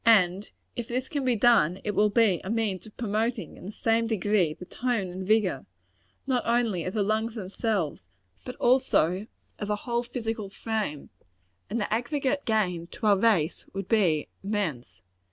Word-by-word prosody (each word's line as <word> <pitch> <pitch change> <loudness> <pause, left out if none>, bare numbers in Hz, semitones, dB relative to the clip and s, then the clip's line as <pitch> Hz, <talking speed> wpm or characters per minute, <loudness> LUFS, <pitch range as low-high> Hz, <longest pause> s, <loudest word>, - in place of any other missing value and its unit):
And 200 -4 +4 0.3
if 240 -2 -4
this 255 +1 -2
can 285 -2 -2
be 250 -2 +2
done, 200 -6 +4
it 210 - -1
will 210 +1 +3
be 205 -4 +3
a 190 - -5
means 220 -3 -1
of 210 - -16
promoting, 225 +1 -1
in - - -10
the - - -5
same 225 +1 +1
degree, 205 -6 +1
the 180 - -10
tone 230 -3 -1
and 185 +1 -6
vigor, 200 - +2 0.6
not 255 -3 +1
only 230 -7 +1
of 185 - -4
the 210 - +2
lungs 220 +2 0
themselves, 195 - -2 0.4
but 250 - -7
also 220 -8 +2 0.3
of 205 - -3
the 210 - +1
whole 235 +3 -1
physical 225 -4 -4
frame; 210 -8 -3 0.6
and 235 - -1
the 210 - -1
aggregate 275 +4 0
gain 180 -7 0
to 220 - -7
our 200 -2 +5
race 190 -8 +2
would 195 -1 -4
be 175 -9 +2 0.2
immense. 145 - -3
215 Hz, 170 wpm, -27 LUFS, 185-230 Hz, 0.6 s, our